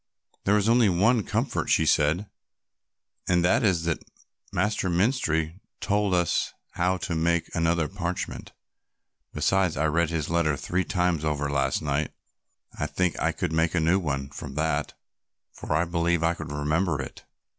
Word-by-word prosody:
"There 105 +2 +4
is 105 0 +1
only 115 -2 +5
one 105 +6 +3
comfort," - - -1
she 80 - +3
said, 80 +6 +2 1.0
"and 90 -1 +3
that 95 - +3
is 95 -6 +2
that 85 -1 -1 0.5
Master 105 -3 0
Menstrie 85 - +1 0.2
told 100 -2 +1
us 85 -2 0 0.2
how 90 +2 0
to 105 -2 -4
make 85 +1 0
another 85 -1 +1
parchment; 90 -1 -4 0.8
besides 95 -5 +1
I 75 - +1
read 80 +1 +2
his 80 -3 -2
letter 80 -3 +1
three 90 +5 -1
times 90 -4 0
over 75 -2 -1
last 70 +1 0
night 75 0 -1 0.6
and - - -11
I 75 - +1
think 90 +4 -1
I - - +1
could 80 - -3
make 80 +2 +1
a - - +3
new 85 +4 +3
one 70 -5 -3
from 70 0 -8
that, 75 -1 -1 0.6
for - - -8
I 80 +2 +2
believe 85 -1 0
I 85 +1 +3
could 80 -3 -7
remember 75 +2 0
it. 65 - -7
85 Hz, 165 wpm, -26 LUFS, 75-90 Hz, 1.0 s, only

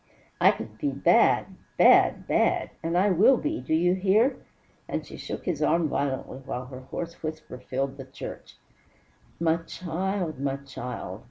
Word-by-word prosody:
I - - +8
could 110 0 -4
be 145 - 0
bad 140 0 +4 0.3
bad - - +5
bad - - +1
and 165 +2 -1
I 195 +2 +4
will 225 +9 +5
be! 310 +5 -2
Do 160 - 0
you 175 +2 +3
hear?" 205 +8 +3 0.5
And - - -3
she - - -10
shook - - -6
his 170 -5 -2
arm 165 +1 +2
violently, 135 -2 -2
while 130 -2 -5
her 130 0 -9
hoarse 165 +6 -6
voice 155 -2 -5 0.3
filled 135 +1 -2
the 135 - -8
church. 130 - -9 0.8
"My 165 0 +2
child! 175 -1 -3
My 135 -1 -1
child! 125 -8 -7
155 Hz, 160 wpm, -27 LUFS, 135-180 Hz, 0.8 s, I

